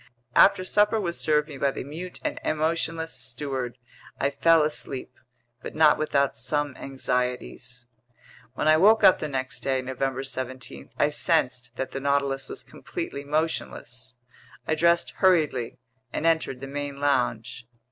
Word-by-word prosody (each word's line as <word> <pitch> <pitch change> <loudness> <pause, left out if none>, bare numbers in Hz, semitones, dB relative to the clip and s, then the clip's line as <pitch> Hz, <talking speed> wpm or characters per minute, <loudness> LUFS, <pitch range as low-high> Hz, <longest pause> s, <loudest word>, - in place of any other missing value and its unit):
After 190 -1 +6
supper 210 +3 +3
was 175 -4 -2
served 150 -1 +2
me 140 -4 -9
by 140 - +2
the - - -5
mute 165 +6 -7
and - - -2
emotionless 160 +1 -1
steward, 130 -2 -4 0.4
I 140 - +1
fell 165 0 +4
asleep; 145 -3 -4 0.5
but - - -8
not 155 -1 +5
without 140 -3 +1
some 145 +3 -1
anxieties. 125 -1 -3 0.7
When 150 - -1
I 155 0 +6
woke 215 +6 +5
up 185 - +7
the 155 - -3
next 130 -2 -3
day, 135 -1 0
November 130 +1 -2
17, 130 -1 -6
I 145 - +3
sensed 125 -7 0
that 130 - -4
the 135 - -4
Nautilus 140 -1 0
was - - -5
completely 140 - -6
motionless. 130 -4 -2 0.5
I - - +2
dressed 170 +2 +3
hurriedly 155 -10 +2 0.3
and - - -3
entered 160 -6 +1
the 135 - -5
main 145 0 -4
lounge. 120 -5 0
140 Hz, 145 wpm, -26 LUFS, 130-160 Hz, 0.7 s, up